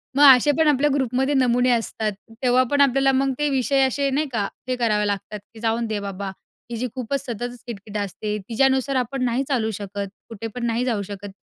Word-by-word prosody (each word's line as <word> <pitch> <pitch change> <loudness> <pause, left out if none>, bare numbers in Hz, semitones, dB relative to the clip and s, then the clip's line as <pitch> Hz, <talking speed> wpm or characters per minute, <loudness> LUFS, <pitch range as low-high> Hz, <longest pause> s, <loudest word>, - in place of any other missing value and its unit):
मग 290 - +5
असे 270 +4 +2
पण 320 -1 +4
आपल्या 295 0 +3
ग्रुपमध्ये 265 +1 0
नमुने 250 -2 +3
असतात, 225 -2 -1 0.3
तेव्हा 250 0 +4
पण 285 0 +3
आपल्याला 270 0 +4
मग 270 +1 +1
ते 295 0 +1
विषय 270 0 +2
असे, 275 +2 0
नाही 295 +3 0
का, 205 -4 -1 0.2
हे 255 - 0
करावे 215 -4 +1
लागतात 205 +1 -3
की 225 - -12
जाऊन 230 +1 0
दे 215 -1 -2
बाबा, 200 0 -5 0.4
हिची 235 +2 -2
खूपच 265 +2 -3
सततच 245 0 -5
किट-किट 210 -2 -6
असते. 210 +1 -3
तिच्यानुसार 265 +3 +2
आपण 255 +1 -1
नाही 245 +2 0
चालू 230 -6 0
शकत. 200 0 -5 0.2
कुठे 225 0 -6
पण 245 -1 -3
नाही 235 +2 0
जाऊ 225 -5 0
शकत. 200 0 -7
245 Hz, 200 wpm, -23 LUFS, 215-270 Hz, 0.4 s, मग